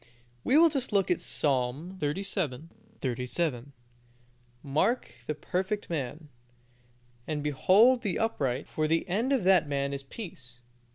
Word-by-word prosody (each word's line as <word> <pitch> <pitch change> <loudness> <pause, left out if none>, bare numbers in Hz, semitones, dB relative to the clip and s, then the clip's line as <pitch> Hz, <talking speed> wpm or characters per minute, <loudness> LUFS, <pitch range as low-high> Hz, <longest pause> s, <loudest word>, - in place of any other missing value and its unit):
We 270 - +4
will 335 +1 +7
just 275 -5 -2
look 200 -3 +2
at 175 - +1
Psalm 140 +6 -1
xxxvii. 160 -2 -2 0.3
37: 125 +1 -2 0.9
"Mark 170 - 0 0.2
the 150 - -1
perfect 190 +5 -3
man, 150 0 -4 1.0
and 150 -2 -2
behold 200 - +5
the 200 -6 -1
upright: 135 - -1
for 155 0 -1
the 165 +1 +1
end 220 +9 0
of 265 -7 +2
that 185 -4 +4
man 140 0 -1
is 140 - -4
peace." 130 - -10
160 Hz, 130 wpm, -29 LUFS, 140-200 Hz, 1.0 s, will